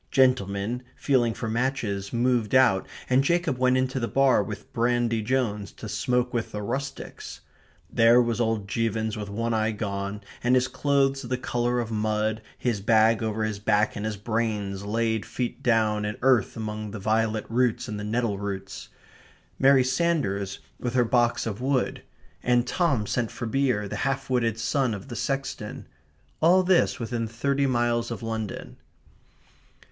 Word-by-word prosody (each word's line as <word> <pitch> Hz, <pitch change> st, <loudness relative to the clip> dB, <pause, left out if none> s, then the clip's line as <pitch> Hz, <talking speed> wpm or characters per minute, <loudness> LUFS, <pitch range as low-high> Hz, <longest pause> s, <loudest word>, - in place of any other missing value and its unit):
Gentlemen, 120 Hz, -3 st, +2 dB
feeling 120 Hz, -5 st, +1 dB
for 115 Hz, -, -4 dB
matches, 110 Hz, -5 st, -1 dB
moved 120 Hz, -1 st, +1 dB
out, 125 Hz, -8 st, +4 dB, 0.2 s
and 130 Hz, +1 st, +3 dB
Jacob 170 Hz, -4 st, +1 dB
went 130 Hz, 0 st, +3 dB
into 130 Hz, 0 st, 0 dB
the 115 Hz, -, -1 dB
bar 135 Hz, -3 st, +4 dB
with 105 Hz, +1 st, -8 dB
Brandy 120 Hz, -1 st, +1 dB
Jones 105 Hz, -5 st, -1 dB
to -, -, -9 dB
smoke 125 Hz, 0 st, 0 dB
with 115 Hz, -2 st, -2 dB
the 105 Hz, 0 st, -4 dB
rustics. 135 Hz, +6 st, -5 dB, 0.5 s
There 115 Hz, +1 st, +5 dB
was 120 Hz, -1 st, +1 dB
old 110 Hz, -3 st, 0 dB
Jevons 110 Hz, 0 st, -1 dB
with 105 Hz, -2 st, -5 dB
one 115 Hz, +3 st, -2 dB
eye 110 Hz, 0 st, +1 dB
gone, 100 Hz, -1 st, -3 dB, 0.2 s
and 125 Hz, +1 st, +4 dB
his 125 Hz, 0 st, +3 dB
clothes 135 Hz, 0 st, +1 dB
the 125 Hz, +1 st, -2 dB
colour 120 Hz, -1 st, -1 dB
of 115 Hz, -1 st, -3 dB
mud, 110 Hz, 0 st, 0 dB, 0.2 s
his 115 Hz, -5 st, -1 dB
bag 110 Hz, +2 st, +4 dB
over 110 Hz, 0 st, -1 dB
his 110 Hz, -2 st, -2 dB
back, 105 Hz, 0 st, +2 dB
and 105 Hz, -, -4 dB
his 110 Hz, -1 st, -3 dB
brains 105 Hz, -2 st, -2 dB
laid 110 Hz, +1 st, 0 dB
feet 125 Hz, -2 st, -4 dB
down 110 Hz, -3 st, +2 dB
in 105 Hz, 0 st, -3 dB
earth 125 Hz, -6 st, +3 dB
among 110 Hz, -1 st, -4 dB
the 105 Hz, +1 st, -6 dB
violet 110 Hz, +1 st, 0 dB
roots 120 Hz, 0 st, +1 dB
and 105 Hz, -2 st, -4 dB
the -, -, -5 dB
nettle 110 Hz, -1 st, -1 dB
roots; 95 Hz, -1 st, -5 dB, 0.7 s
Mary 135 Hz, -1 st, +6 dB
Sanders 130 Hz, -, 0 dB, 0.2 s
with 125 Hz, 0 st, -3 dB
her 125 Hz, -1 st, +4 dB
box 120 Hz, 0 st, +2 dB
of 110 Hz, 0 st, -4 dB
wood; 130 Hz, -1 st, 0 dB, 0.4 s
and 120 Hz, 0 st, +2 dB
Tom 145 Hz, -, +1 dB
sent 115 Hz, +2 st, -1 dB
for 120 Hz, -, -6 dB
beer, 125 Hz, -4 st, 0 dB
the -, -, -5 dB
half 135 Hz, -1 st, -2 dB
witted 115 Hz, -3 st, +1 dB
son 125 Hz, 0 st, 0 dB
of 100 Hz, +6 st, -10 dB
the 120 Hz, -, -6 dB
sexton 135 Hz, -5 st, -3 dB, 0.6 s
all 180 Hz, +4 st, +5 dB
this 185 Hz, 0 st, +3 dB
within 115 Hz, -1 st, -2 dB
thirty 140 Hz, +5 st, 0 dB
miles 120 Hz, -2 st, +1 dB
of 115 Hz, -1 st, -6 dB
London. 110 Hz, -2 st, -5 dB
115 Hz, 165 wpm, -26 LUFS, 105-125 Hz, 0.7 s, Mary